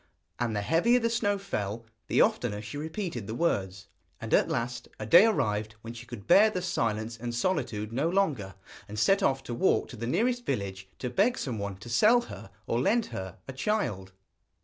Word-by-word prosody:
And 120 Hz, -3 st, -1 dB
the 105 Hz, -, -1 dB
heavier 175 Hz, -, +3 dB
the 230 Hz, -1 st, 0 dB
snow 205 Hz, -3 st, +1 dB
fell 115 Hz, -, -4 dB, 0.2 s
the -, -, +3 dB
oftener 105 Hz, -, +1 dB
she 110 Hz, +7 st, -8 dB
repeated 160 Hz, -, -4 dB
the 110 Hz, -, -4 dB
words. 95 Hz, -, -1 dB, 0.3 s
And -, -, -5 dB
at -, -, +4 dB
last 120 Hz, 0 st, -3 dB
a 110 Hz, -, -4 dB
day 175 Hz, -, +8 dB
arrived 110 Hz, -, 0 dB
when 115 Hz, +1 st, -7 dB
she 120 Hz, 0 st, -10 dB
could 120 Hz, -5 st, -9 dB
bear 215 Hz, +2 st, +6 dB
the 185 Hz, -4 st, -3 dB
silence 115 Hz, -9 st, -1 dB
and 120 Hz, 0 st, -4 dB
solitude 115 Hz, -, -1 dB
no 140 Hz, +7 st, +1 dB
longer, 145 Hz, -, 0 dB, 0.3 s
and 105 Hz, 0 st, -8 dB
set 195 Hz, -, +3 dB
off 135 Hz, -7 st, +1 dB
to 120 Hz, -, -5 dB
walk 190 Hz, +11 st, +2 dB
to -, -, -8 dB
the 115 Hz, 0 st, -5 dB
nearest 240 Hz, -, +1 dB
village 95 Hz, -, -3 dB
to 125 Hz, -, -4 dB
beg 235 Hz, -, +2 dB
someone 100 Hz, -6 st, -4 dB
to 120 Hz, -, -11 dB
sell 215 Hz, -, +5 dB
her 240 Hz, -, -10 dB, 0.2 s
or 115 Hz, -, 0 dB
lend 220 Hz, -, +2 dB
her 95 Hz, -1 st, -6 dB
a 130 Hz, -, -6 dB
child. 130 Hz, -, -2 dB
120 Hz, 195 wpm, -28 LUFS, -, 0.3 s, day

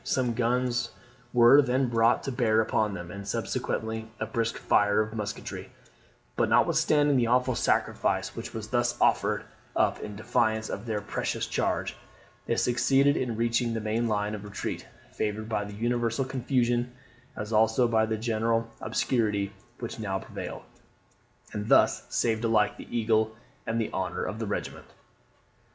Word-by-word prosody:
Some 125 Hz, -3 st, 0 dB
guns 120 Hz, +1 st, 0 dB, 0.4 s
were 125 Hz, +4 st, +7 dB
then 130 Hz, 0 st, +1 dB
brought 115 Hz, 0 st, +3 dB
to 135 Hz, -, -3 dB
bear 115 Hz, -4 st, +2 dB
upon 105 Hz, -2 st, +1 dB
them, 90 Hz, -1 st, -7 dB
and 100 Hz, +1 st, -8 dB
subsequently 110 Hz, +1 st, -2 dB
a 110 Hz, -, -1 dB
brisk 115 Hz, +1 st, -1 dB
fire 105 Hz, 0 st, +3 dB
of 110 Hz, 0 st, -1 dB
musketry; 105 Hz, -2 st, -5 dB, 0.7 s
but -, -, +1 dB
notwithstanding 145 Hz, -2 st, +3 dB
the 120 Hz, -2 st, +2 dB
awful 125 Hz, +2 st, +2 dB
sacrifice -, -, 0 dB
which -, -, -6 dB
was -, -, -6 dB
thus -, -, 0 dB
offered -, -, +2 dB, 0.3 s
up -, -, +2 dB
in 105 Hz, -, -7 dB
defence 110 Hz, 0 st, 0 dB
of 105 Hz, +4 st, -5 dB
their 105 Hz, -2 st, -1 dB
precious 105 Hz, -, -2 dB
charge, -, -, -1 dB, 0.5 s
they -, -, +1 dB
succeeded 135 Hz, +4 st, +3 dB
in 120 Hz, -3 st, -1 dB
reaching 115 Hz, 0 st, +1 dB
the -, -, -1 dB
main 110 Hz, +2 st, -1 dB
line 105 Hz, -1 st, 0 dB
of 105 Hz, -1 st, -6 dB
retreat, 100 Hz, -1 st, -5 dB, 0.2 s
favoured 110 Hz, +1 st, -3 dB
by 110 Hz, -2 st, -1 dB
the 105 Hz, -, -8 dB
universal 120 Hz, +3 st, 0 dB
confusion, 125 Hz, -2 st, 0 dB, 0.4 s
as 105 Hz, +2 st, -5 dB
also 110 Hz, +3 st, +4 dB
by 110 Hz, -1 st, +3 dB
the 110 Hz, 0 st, -1 dB
general 115 Hz, 0 st, 0 dB
obscurity 105 Hz, -3 st, 0 dB, 0.2 s
which 115 Hz, -1 st, -6 dB
now 95 Hz, -3 st, -2 dB
prevailed; -, -, -7 dB, 0.9 s
and 105 Hz, +1 st, -4 dB
thus -, -, +4 dB
saved 115 Hz, -1 st, 0 dB
alike 110 Hz, -2 st, +2 dB
the -, -, -11 dB
eagle 110 Hz, -1 st, +1 dB, 0.3 s
and 115 Hz, +1 st, 0 dB
the 110 Hz, -, -2 dB
honour 95 Hz, -1 st, -2 dB
of 105 Hz, +4 st, -4 dB
the 115 Hz, -, -3 dB
regiment." 100 Hz, -, -4 dB
115 Hz, 155 wpm, -28 LUFS, 110-120 Hz, 0.9 s, were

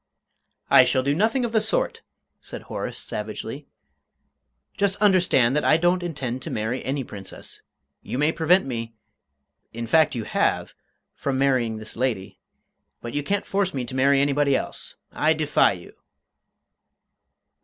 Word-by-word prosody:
"I -, -, +9 dB
shall 130 Hz, -, +1 dB
do 140 Hz, +2 st, +1 dB
nothing 225 Hz, -, +1 dB
of 235 Hz, -, -3 dB
the 220 Hz, -1 st, +2 dB
sort," -, -, 0 dB, 0.4 s
said -, -, -9 dB
Horace, -, -, -5 dB
savagely. -, -, -6 dB, 1.1 s
"Just 200 Hz, -2 st, +1 dB
understand 180 Hz, -, +3 dB
that 150 Hz, -, +1 dB
I 155 Hz, -, +5 dB
don't 175 Hz, +2 st, +2 dB
intend 135 Hz, -7 st, -4 dB
to -, -, -6 dB
marry 110 Hz, +4 st, -2 dB
any 135 Hz, +1 st, -2 dB
Princess. 100 Hz, -5 st, -10 dB, 0.4 s
You -, -, -5 dB
may 150 Hz, +3 st, +2 dB
prevent 170 Hz, +4 st, +3 dB
me 115 Hz, -3 st, -5 dB, 0.8 s
in 115 Hz, +1 st, -4 dB
fact, 155 Hz, +4 st, +3 dB
you 115 Hz, -, -3 dB
have -, -, 0 dB, 0.4 s
from 135 Hz, -2 st, -2 dB
marrying 130 Hz, -5 st, +1 dB
this 110 Hz, 0 st, -9 dB
lady, 115 Hz, -6 st, -2 dB, 0.6 s
but 120 Hz, -, -7 dB
you 145 Hz, -, 0 dB
can't 200 Hz, +7 st, -1 dB
force 195 Hz, -1 st, -1 dB
me 130 Hz, -2 st, -2 dB
to 130 Hz, -, -7 dB
marry 135 Hz, +1 st, +4 dB
anybody 140 Hz, 0 st, +2 dB
else. -, -, -4 dB, 0.2 s
I 155 Hz, +1 st, +2 dB
defy 150 Hz, -9 st, +3 dB
you!" 90 Hz, -2 st, -12 dB
140 Hz, 150 wpm, -24 LUFS, 120-175 Hz, 1.1 s, I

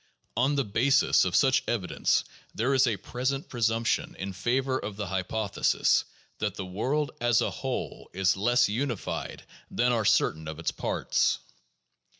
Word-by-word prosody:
On 135 Hz, +4 st, +2 dB
the 140 Hz, -, +2 dB
basis 130 Hz, +7 st, +3 dB
of -, -, -1 dB
such 135 Hz, -2 st, +4 dB
evidence, 100 Hz, -6 st, +1 dB, 0.3 s
there 125 Hz, +5 st, +1 dB
is 130 Hz, -1 st, +4 dB
a 110 Hz, -4 st, 0 dB
present 130 Hz, +7 st, -3 dB
presumption 115 Hz, -1 st, 0 dB
in 95 Hz, 0 st, -5 dB
favor 130 Hz, +7 st, 0 dB
of 105 Hz, -, -6 dB
the 105 Hz, 0 st, -4 dB
hypothesis 95 Hz, +2 st, +1 dB, 0.3 s
that 105 Hz, -2 st, -2 dB
the 95 Hz, -, -5 dB
world 130 Hz, +11 st, -1 dB
as 120 Hz, -1 st, +3 dB
a -, -, 0 dB
whole -, -, -5 dB
is 95 Hz, 0 st, +2 dB
less 120 Hz, +6 st, +3 dB
unified 120 Hz, +1 st, -3 dB, 0.3 s
than 125 Hz, +1 st, +1 dB
are 115 Hz, -2 st, +1 dB
certain 80 Hz, -5 st, +2 dB
of 80 Hz, 0 st, -6 dB
its 85 Hz, -, -2 dB
parts. -, -, 0 dB
115 Hz, 150 wpm, -28 LUFS, 100-130 Hz, 0.3 s, such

